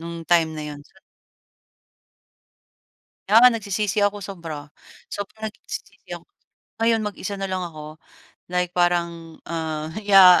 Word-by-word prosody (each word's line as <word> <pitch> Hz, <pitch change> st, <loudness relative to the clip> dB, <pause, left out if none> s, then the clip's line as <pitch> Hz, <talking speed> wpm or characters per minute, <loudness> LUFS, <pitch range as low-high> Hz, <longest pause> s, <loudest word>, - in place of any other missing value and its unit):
no'ng 170 Hz, 0 st, -6 dB
time 165 Hz, -2 st, +3 dB
na 155 Hz, -, -4 dB
'yon. 145 Hz, -, -9 dB
Sa 190 Hz, +6 st, -21 dB, 2.3 s
Kaya 225 Hz, +4 st, +7 dB
nga 250 Hz, -, +9 dB
nagsisisi 205 Hz, +1 st, 0 dB
ako 205 Hz, -1 st, +1 dB
sobra, 160 Hz, -6 st, -7 dB, 0.4 s
sobrang 215 Hz, +2 st, -5 dB
nagsisisi -, -, -8 dB
ako. -, -, -15 dB, 0.5 s
Ngayon 225 Hz, 0 st, +3 dB
mag-isa 205 Hz, -1 st, -4 dB
na 195 Hz, -, -2 dB
lang 185 Hz, -1 st, -2 dB
ako, 155 Hz, -2 st, -8 dB, 0.5 s
like 180 Hz, 0 st, 0 dB
parang 170 Hz, -2 st, 0 dB
ah, 160 Hz, -1 st, -3 dB
yeah, 195 Hz, -3 st, +8 dB
180 Hz, 125 wpm, -23 LUFS, 165-205 Hz, 2.3 s, nga